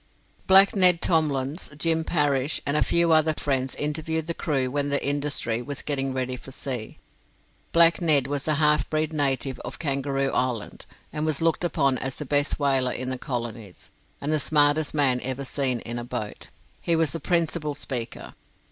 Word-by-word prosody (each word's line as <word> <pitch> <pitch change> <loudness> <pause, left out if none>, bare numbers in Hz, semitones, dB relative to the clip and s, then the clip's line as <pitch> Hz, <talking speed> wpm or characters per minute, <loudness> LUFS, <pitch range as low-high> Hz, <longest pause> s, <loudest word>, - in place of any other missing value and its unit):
Black 195 +2 +6
Ned 180 -3 +5
Tomlins, 150 -2 0
Jim 160 +1 +1
Parrish, 145 -3 0
and 140 - 0
a - - +2
few 170 -1 +2
other 155 0 +3
friends 135 -2 -1
interviewed 160 +2 -2
the 170 - -2
crew 140 -6 -1
when 145 +1 -1
the 140 0 +1
'Industry' 140 -5 -1
was 140 +2 -4
getting 135 -2 -1
ready 130 -1 -3
for 130 - -12
sea. 130 -4 -5 0.7
Black 170 +1 +5
Ned 150 -6 +4
was 140 +1 -3
a 155 - +2
half 150 0 +2
breed 155 0 -1
native 135 -3 0
of - - -7
Kangaroo 135 -2 -1
Island, 125 -4 -3 0.3
and 150 0 -3
was 155 -2 0
looked 165 +1 +1
upon 140 -6 +1
as 130 0 -3
the 150 - -6
best 145 +1 +1
whaler 135 -3 +2
in 130 +1 -4
the 130 - -4
colonies, 115 -7 -6 0.3
and 145 - -3
the 155 - +2
smartest 145 +1 +2
man 130 -4 +3
ever 130 +1 -4
seen 130 -3 0
in 120 +1 -5
a - - -5
boat. 120 -4 -6 0.3
He 170 - 0
was 160 -3 +2
the 165 - -4
principal 165 -4 -1
speaker. 130 -5 -6
145 Hz, 180 wpm, -25 LUFS, 130-155 Hz, 0.7 s, Black